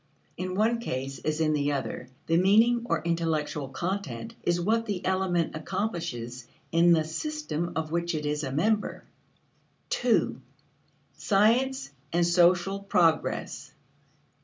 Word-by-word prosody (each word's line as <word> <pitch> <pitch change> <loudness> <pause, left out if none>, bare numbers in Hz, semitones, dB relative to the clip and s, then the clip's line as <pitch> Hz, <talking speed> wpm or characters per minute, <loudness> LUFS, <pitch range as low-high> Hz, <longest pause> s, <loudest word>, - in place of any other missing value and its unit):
In 185 0 -4
one 225 +3 +2
case, 135 - -4
as 155 0 -2
in 155 -1 +2
the 145 -1 +1
other, 130 -2 -4 0.2
the 165 - +1
meaning, 220 +6 +4
or 165 -2 0
intellectual 160 -4 -1
content, 140 - -4
is 175 0 +1
what 225 +6 +1
the 200 -4 -3
element 185 -3 0
accomplishes 155 - -4 0.2
in 170 +1 +5
the 160 -2 +4
system 175 - -3
of 155 -1 -2
which 170 0 -1
it 150 -1 -3
is 150 +1 -1
a 135 - -3
member. 210 +9 0 0.9
2. - - +1 0.8
Science 230 - +2 0.2
and 170 +1 +2
Social 175 +2 +3
Progress. 175 -5 0
170 Hz, 130 wpm, -27 LUFS, 155-200 Hz, 0.9 s, in